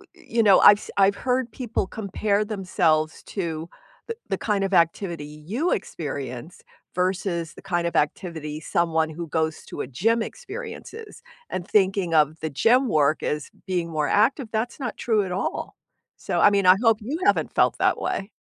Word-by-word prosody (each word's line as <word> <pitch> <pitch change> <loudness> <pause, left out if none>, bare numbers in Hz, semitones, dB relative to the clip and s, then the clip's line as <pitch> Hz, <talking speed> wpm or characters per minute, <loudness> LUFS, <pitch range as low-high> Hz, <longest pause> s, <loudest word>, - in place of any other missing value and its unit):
you 240 -10 -1
know, 205 -3 +6
I've 205 - +9
s - - -11
I've 200 0 +4
heard 250 0 -1
people 230 -5 -3
compare 205 0 -1
themselves 175 -6 0
to 165 -4 -4 0.4
the 460 - -4
the 195 - 0
kind 205 -3 0
of 195 0 -2
activity 170 -2 +1
you 170 - -3
experience 140 -1 -5 0.3
versus 180 -2 -1
the - - -12
kind 175 -3 -1
of 170 - -1
activity 155 -1 -2
someone 160 -1 0
who 165 +2 -6
goes 160 0 -2
to - - -6
a - - -4
gym 225 - +1
experiences, 450 - -8 0.3
and 180 -1 -4
thinking 190 -4 +2
of 155 0 +3
the 160 - -3
gym 245 - +3
work 155 -3 +2
as 150 -2 -2 0.2
being 175 -3 -1
more 155 -2 -1
active, 255 +5 +2
that's 230 +4 -2
not 245 -5 -4
true 220 -3 +1
at 180 - -4
all. 190 - -3 0.4
So, - - -2
I - - +7
mean, 200 -2 +1
I 185 - +8
hope 225 -3 +4
you 275 +10 -4
haven't - - +2
felt - - +2
that - - +2
way. 195 +2 -3
190 Hz, 175 wpm, -24 LUFS, 160-220 Hz, 0.4 s, I've